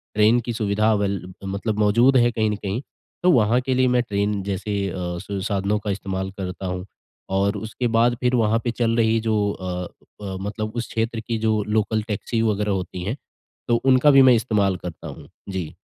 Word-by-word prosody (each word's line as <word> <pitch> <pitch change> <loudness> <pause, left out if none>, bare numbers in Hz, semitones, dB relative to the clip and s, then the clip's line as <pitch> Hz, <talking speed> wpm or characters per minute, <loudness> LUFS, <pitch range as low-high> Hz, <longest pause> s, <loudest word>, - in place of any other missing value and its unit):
Train 110 +3 +5
की 120 - -2
सुविधा 110 0 +1
avail 100 -2 0 0.2
मतलब 100 +2 -3
मौजूद 120 +6 +4
है, 120 0 +4
कहीं 110 -2 0
न 105 - -1
कहीं 100 +4 -3 0.4
तो 180 - +5
वहाँ 115 -2 +4
के 130 0 -1
लिए 130 0 +3
मैं 125 0 +3
ट्रेन 100 -2 -1
जैसे 100 +1 -3 0.2
अ, 85 - -6 0.3
स 100 -1 -5
साधनों 100 0 0
का 105 -1 -3
इस्तेमाल 95 -1 -3
करता 95 0 -5
हूँ, 90 0 -4 0.4
और 100 +2 +1
उसके 110 +4 -3
बाद 120 +1 +4
फिर 125 0 +2
वहाँ 115 -1 +2
पे 120 - 0
चल 115 -1 0
रही 115 0 +3
जो 110 -1 0 0.2
अ 95 -2 -5 0.5
अ, 95 -1 -4
मतलब 110 +2 -4
उस 120 -1 -3
क्षेत्र 115 0 -1
की 115 +1 -3
जो 110 -1 +1
लोकल 110 0 +1
टैक्सी 115 +2 -2
वगैरह 105 -2 0
होती 90 -2 -3
हैं, 110 +9 -3 0.5
तो 120 - +3
उनका 135 +2 +6
भी 135 - +7
मैं 130 -1 +7
इस्तेमाल 105 -5 +1
करता 85 -2 -8
हूँ। - - -10 0.2
जी। 90 -5 -4
110 Hz, 200 wpm, -23 LUFS, 100-115 Hz, 0.5 s, भी